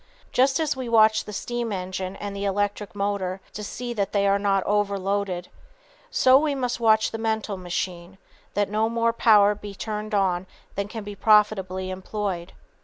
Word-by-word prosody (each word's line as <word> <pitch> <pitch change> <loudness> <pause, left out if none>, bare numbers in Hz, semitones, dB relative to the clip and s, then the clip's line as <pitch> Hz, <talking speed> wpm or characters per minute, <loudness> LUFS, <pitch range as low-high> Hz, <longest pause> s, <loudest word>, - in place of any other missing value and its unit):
Just 265 +3 +3
as 310 -3 0
we 260 -2 -5
watch 220 -1 +5
the - - -7
steam 240 +2 -3
engine 185 0 -4
and 200 0 -6
the 200 - -4
electric 205 -1 -1
motor 200 -2 -2
to 210 - -6
see 240 +3 -5
that 200 -4 -2
they 200 -1 +2
are 200 0 +3
not 195 -1 +1
"overloaded," 200 -2 -1 0.6
so 260 +1 +5
we 295 -1 0
must 250 -3 -2
watch 220 -1 +3
the 225 - -5
mental 220 -2 -1
machine, 180 0 -4 0.4
that 205 -1 +2
no 215 +2 0
more 230 0 +1
power 210 -3 +5
be 205 -1 -9
turned 215 +1 -4
on 185 -2 +1 0.3
than 200 0 -2
can 220 +1 -6
be 205 0 -7
profitably 195 -4 +2
employed. 190 -2 -4
205 Hz, 175 wpm, -25 LUFS, 195-220 Hz, 0.6 s, watch